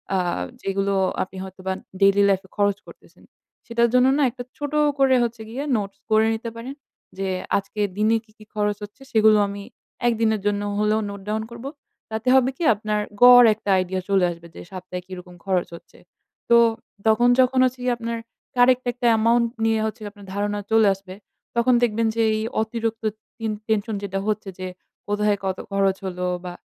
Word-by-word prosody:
আ - - +3 0.4
যেগুলো 195 0 -1 0.3
আপনি 190 0 -11
হয়তোবা 190 0 -5 0.3
ডেইলি 195 +1 +5
লাইফ 190 -1 +2
এ - - -47
খরচ 200 -1 +2
করতেছেন। - - -17 0.4
সেটার 235 0 +2
জন্য 250 0 +5
না - - +1
একটা 245 0 -8
ছোট 290 0 -5 0.3
করে 265 -1 +5
হচ্ছে 235 -1 -3
গিয়ে 255 +5 -4
নোটস 200 -2 -4
করে 220 0 +5
নিতে 225 +1 -4
পারেন 240 +4 -7 0.4
যে, 195 0 -2 0.3
"আজকের 205 +1 -2
দিনে 215 +2 +3
কি, 220 - -26
কি 215 - -15
খরচ 210 -1 0
হচ্ছে 205 +7 -11
সেগুলো 220 -1 +5
আমি 200 0 -7 0.4
একদিনের 225 -2 +1
জন্য 205 0 +1 0.2
হলেও 210 +1 +2
নোট 200 -1 -8
ডাউন 220 +1 -1
করব।" 235 +2 -9 0.5
তাতে 220 +3 -4
হবে 260 -1 +4
কি? - - -4
আপনার 210 0 -2 0.2
গড় 245 0 +10
একটা 205 - -7
আইডিয়া 185 0 -1
চলে 195 -2 +3
আসবে 170 0 -11
যে - - -9
সপ্তাহে 185 -1 -7
কিরকম 180 -1 -10
খরচ 185 -2 0
হচ্ছে? - - -16 0.5
তো 235 - +7 0.5
তখন 220 +2 +4
যখন 255 0 +4
হচ্ছে 255 0 -2
গিয়ে 250 -1 +2
আপনার 230 0 -4 0.4
কারেক্ট 250 +1 +4
একটা 245 0 -1
অ্যামাউন্ট 230 +1 +3 0.2
নিয়ে 225 0 +2
হচ্ছে 220 +2 -4
গিয়ে 205 -1 -6
আপনার 205 -1 -15
ধারণা 205 +1 -1
চলে 220 -1 +5
আসবে 190 -1 -11 0.4
তখন 235 +2 +3
দেখবেন 230 -1 +1
যে 230 - +1 0.2
এই - - -2 0.2
অতিরিক্ত 225 0 -3 0.3
টিন 225 -1 -2 0.2
টেনশন 220 0 0
যেটা 195 -1 -3
হচ্ছে 215 -2 -2
যে 185 - -4 0.4
কোথায় 205 0 +1
কত 190 -1 -1
খরচ 195 -1 +1
হলো? 180 -1 -3 0.2
বা 180 - -5
215 Hz, 180 wpm, -23 LUFS, 195-235 Hz, 0.5 s, গড়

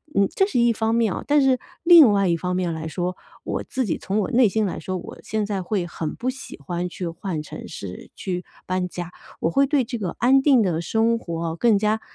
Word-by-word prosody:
嗯， 200 0 +4
这 385 - +3
是 385 - 0
一 235 0 +4
方 220 +1 0
面 225 -5 +2
哦， - - -5
但 295 0 +4
是 265 -2 +3 0.2
另 330 -9 +9
外 200 -1 +2
一 170 - +2
方 180 +2 -2
面 180 -2 -1
来 160 0 -5
说， 180 +2 -3 0.3
我 - - -3
自 260 -2 -2
己 185 - -1
从 195 +2 -2
我 210 - -1
内 245 -3 +5
心 220 +2 0
来 190 - -3
说， 185 +3 -4
我 - - -9
现 215 -1 -2
在 200 -2 -2
会 185 0 -1
很 160 -2 -5
不 255 +2 -2
喜 260 0 -10
欢 175 +5 -3
去 180 0 -5
换 165 -1 -4
城 - - -9
市 95 -2 -8
去 180 -1 -4 0.2
搬 185 0 -1
家， 175 0 -6 0.3
我 165 - +1
会 275 +6 +3
对 280 -1 +2
这 235 -1 -5
个 185 -4 -3
安 265 +3 +4
定 265 -5 +5
的 170 -4 0
生 225 +6 +1
活 165 -3 -4
更 225 +2 +4
加， 215 +2 +1
200 Hz, 255 characters per minute, -23 LUFS, 175-235 Hz, 0.3 s, 另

